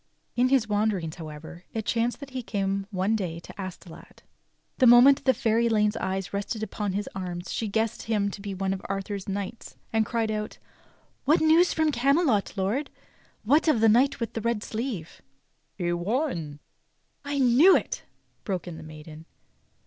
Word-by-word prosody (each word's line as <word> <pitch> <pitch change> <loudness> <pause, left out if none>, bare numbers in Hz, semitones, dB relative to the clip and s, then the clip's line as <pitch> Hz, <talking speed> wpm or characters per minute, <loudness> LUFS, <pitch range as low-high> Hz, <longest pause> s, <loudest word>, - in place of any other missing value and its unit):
In 250 +1 +3
his 260 -5 +3
wanderings, 205 -6 -1
however, 160 +2 -9
it 220 -1 -2
chanced 235 +2 0
that 280 -1 -9
he 260 -1 -4
came 195 -3 -2
one 195 +2 0
day 175 -6 -3
to - - -11
Astolat. 185 -2 -10 0.6
The 255 - +6
moment 255 +4 +7
the 260 - +5
fair 225 -1 +1
Elaine's 215 -3 +2
eyes 190 0 -3
rested 205 +2 -3
upon 205 -1 -3
his 205 +1 -2
arms 180 -1 -5
she 225 - -2
guessed 220 +2 -1
him 205 -3 0
to 200 - -8
be 200 -1 -5
one 190 0 -1
of 190 - -5
Arthur's 195 0 -4
knights 200 +3 -5 0.2
and 225 0 +3
cried 225 0 -1
out: 215 0 -4 0.7
"What 305 +4 +4
news 320 +3 +5
from 315 -1 +1
Camelot, 275 - +2
lord.^ 215 +10 0 0.6
What 290 +10 +3
of 300 -8 +4
the 225 0 +5
knight 250 +6 +3
with 230 -2 -3
the 225 - -3
red 230 -1 -1
sleeve.^" 220 -8 -5 0.6
"He 175 -2 -1
won 175 - -2 0.2
— - - -46
" - - -46
"I - - -1
knew 270 +8 +6
it!" - - -5 0.4
broke 185 -3 -3
in 170 -2 -7
the - - -9
maiden. 155 0 -11
210 Hz, 180 wpm, -26 LUFS, 190-240 Hz, 0.7 s, moment